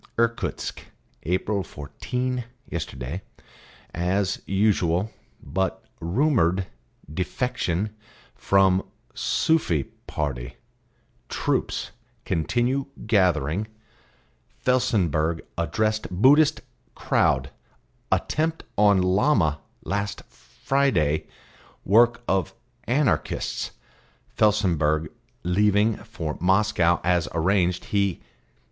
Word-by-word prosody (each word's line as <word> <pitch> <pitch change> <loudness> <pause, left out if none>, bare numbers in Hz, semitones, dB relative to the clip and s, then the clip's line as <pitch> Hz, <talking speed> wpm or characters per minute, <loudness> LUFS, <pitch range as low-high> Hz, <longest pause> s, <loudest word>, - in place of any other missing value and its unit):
"'Irkutsk 115 0 -1 0.4
April 95 +4 0
fourteen 125 - -4 0.2
Yesterday 70 0 -5 0.7
as 90 +3 0
usual 95 -1 +2 0.3
But 95 +6 -2
rumoured 95 - +2 0.5
defection 100 +1 -2 0.4
from 95 -1 +3 0.3
Sufi 90 - +1 0.2
party - - -3 0.7
Troops - - -1 0.3
continue 120 - 0 0.2
gathering 95 - +2 1.0
Felsenburgh 90 - +2 0.2
addressed 110 +7 0
Buddhist 135 - +4 0.3
crowd 65 +1 +1 0.6
Attempt 160 +1 0 0.2
on 100 -3 +5
Llama 90 - +2 0.2
last 100 +1 -3
Friday 85 - 0 0.6
work 115 +3 +4
of 95 0 0 0.3
Anarchists 120 - 0 0.7
Felsenburgh 80 -8 +2 0.3
leaving 105 +4 +3
for 85 -8 -6
Moscow 95 -2 +3
as 90 -2 +2
arranged 90 +1 +1
he.... 100 -3 0
95 Hz, 70 wpm, -25 LUFS, 85-110 Hz, 1.0 s, on